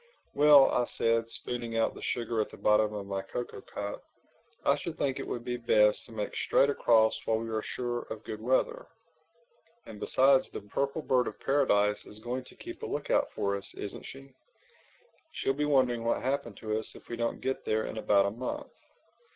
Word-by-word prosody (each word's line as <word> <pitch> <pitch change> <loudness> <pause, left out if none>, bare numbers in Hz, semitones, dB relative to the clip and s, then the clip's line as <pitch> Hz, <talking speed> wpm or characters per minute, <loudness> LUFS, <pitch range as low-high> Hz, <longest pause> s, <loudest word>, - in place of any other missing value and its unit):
"Well," 145 -1 +7
I 125 - +2
said, 115 0 +1
spooning 120 -1 -4
out 115 - +2
the - - -11
sugar 115 -2 -1
at - - -3
the - - -12
bottom 105 0 +3
of 105 -2 -5
my 95 -1 -3
cocoa 120 +5 -6
cup, 100 0 -6 0.6
"I - - +5
should - - -6
think 135 -1 -1
it 135 - -5
would 120 0 -4
be 125 0 -2
best 105 -3 +3
to - - -14
make 105 -2 -4
straight 140 - +3
across 110 -5 +4
while 110 - +2
we 115 +1 -4
are 110 -1 -1
sure 120 +1 -3
of 110 0 -6
good 110 0 -6
weather. 130 - 0 1.0
And 105 -2 -10
besides 135 +3 +4
the - - -7
Purple 140 +9 -2
Bird 125 -3 +2
of - - -6
Paradise 105 -7 +2
is 105 - -10
going 125 +4 -4
to - - -15
keep - - -9
a - - -4
lookout - - 0
for 100 0 0
us, 100 -1 -6
isn't 100 - -6
she? 135 0 -11 1.0
She'll 135 - 0
be 150 +2 -1
wondering 130 -5 +2
what's 115 - 0
happened 130 -5 -2
to 110 0 -1
us 110 - -7
if - - -14
we 120 - -4
don't 115 0 -2
get 130 0 -2
there 110 0 0
in 110 - -5
about 100 -2 +4
a 100 - 0
month." 120 +4 -5
115 Hz, 200 wpm, -30 LUFS, 110-130 Hz, 1.0 s, Well